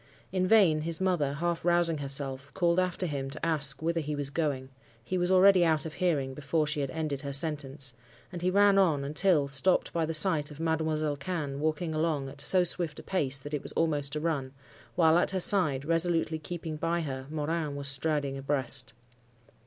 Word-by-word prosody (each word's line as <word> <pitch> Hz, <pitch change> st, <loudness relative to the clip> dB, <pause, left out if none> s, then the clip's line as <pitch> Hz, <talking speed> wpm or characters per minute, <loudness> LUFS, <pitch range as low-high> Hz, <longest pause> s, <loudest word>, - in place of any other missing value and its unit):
In 185 Hz, -1 st, 0 dB
vain 185 Hz, -8 st, +4 dB
his 165 Hz, +1 st, -3 dB
mother, 175 Hz, -7 st, 0 dB
half 170 Hz, +3 st, -2 dB
rousing 170 Hz, -2 st, +2 dB
herself, 135 Hz, 0 st, -2 dB
called 175 Hz, -2 st, +2 dB
after 185 Hz, 0 st, -1 dB
him 140 Hz, -4 st, -4 dB
to 155 Hz, +4 st, -5 dB
ask 150 Hz, -3 st, +2 dB
whither 165 Hz, +1 st, 0 dB
he 150 Hz, 0 st, -4 dB
was 145 Hz, -1 st, -3 dB
going: 140 Hz, -5 st, -2 dB, 0.3 s
he 185 Hz, -, -4 dB
was 180 Hz, 0 st, 0 dB
already 190 Hz, 0 st, +5 dB
out 160 Hz, -2 st, +2 dB
of 160 Hz, -, -6 dB
hearing 145 Hz, -8 st, -1 dB
before 150 Hz, +3 st, -1 dB
she 150 Hz, +1 st, -1 dB
had 140 Hz, -2 st, -2 dB
ended 155 Hz, -2 st, -4 dB
her 140 Hz, -1 st, -5 dB
sentence, 140 Hz, -3 st, -3 dB, 0.4 s
and 175 Hz, -2 st, -7 dB
he 180 Hz, -, +1 dB
ran 200 Hz, +1 st, +4 dB
on 160 Hz, -7 st, +2 dB
until, 150 Hz, +1 st, +1 dB
stopped 140 Hz, +7 st, +1 dB
by 165 Hz, -2 st, -1 dB
the 165 Hz, -, -3 dB
sight 155 Hz, -3 st, +5 dB
of 150 Hz, 0 st, -12 dB
Mademoiselle 160 Hz, -2 st, -1 dB
Cannes 145 Hz, -3 st, -4 dB
walking 155 Hz, +2 st, -2 dB
along 155 Hz, -3 st, -1 dB
at 140 Hz, +1 st, -5 dB
so 185 Hz, +4 st, +3 dB
swift 170 Hz, -3 st, -1 dB
a -, -, -10 dB
pace 140 Hz, -8 st, +2 dB
that 145 Hz, +2 st, -9 dB
it 150 Hz, -, -2 dB
was -, -, -5 dB
almost 145 Hz, -3 st, -1 dB
a -, -, -1 dB
run; 145 Hz, -5 st, -3 dB, 0.4 s
while 165 Hz, -1 st, +4 dB
at -, -, +1 dB
her 190 Hz, -, -2 dB
side, 155 Hz, -8 st, +2 dB
resolutely 165 Hz, -1 st, +1 dB
keeping 160 Hz, 0 st, -6 dB
by 165 Hz, +2 st, -1 dB
her, 135 Hz, -3 st, -6 dB
Morin 155 Hz, -1 st, -3 dB
was 140 Hz, 0 st, -3 dB
striding 140 Hz, -1 st, -1 dB
abreast. 135 Hz, -2 st, -1 dB
155 Hz, 200 wpm, -28 LUFS, 140-170 Hz, 0.4 s, already